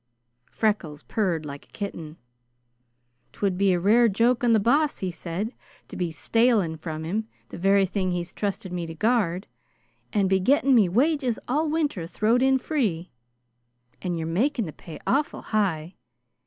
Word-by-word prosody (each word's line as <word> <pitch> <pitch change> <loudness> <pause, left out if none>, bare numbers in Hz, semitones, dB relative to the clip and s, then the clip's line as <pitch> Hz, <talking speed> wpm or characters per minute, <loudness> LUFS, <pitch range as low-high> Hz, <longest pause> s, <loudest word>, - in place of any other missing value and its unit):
Freckles 195 -9 -1
purred 180 -8 -1
like 140 -1 -8
a - - -34
kitten. 170 -6 -6 1.2
"'Twould 195 -3 -1
be 195 +1 +3
a 180 - +2
rare 225 +6 +5
joke 235 +5 +2
on 240 - +4
the 225 - +5
Boss," 285 +8 +2
he 185 -2 -3
said, 175 +7 -4 0.4
"to - - -9
be 175 -2 -2
stalin' 205 - +2
from 160 0 -6
him 210 +7 -2 0.2
the - - -8
very 195 +1 +4
thing 190 0 -1
he's 175 0 -3
trusted 195 -3 -3
me 175 -2 -3
to 165 - -7
guard, 200 -2 +1 0.7
and 200 -3 +2
be 190 0 +3
getting 270 +6 +3
me 215 -7 +5
wages 260 - +1
all 300 +5 +1
winter 295 - -1
throwed 220 +7 +1
in 265 0 +4
free. 220 - -2 0.9
And 175 -2 -2
you're 160 - -3
making 225 - 0
the 155 - -7
pay 165 - -10
awful 290 +3 0
high. 185 -6 -1
200 Hz, 165 wpm, -25 LUFS, 170-240 Hz, 1.2 s, rare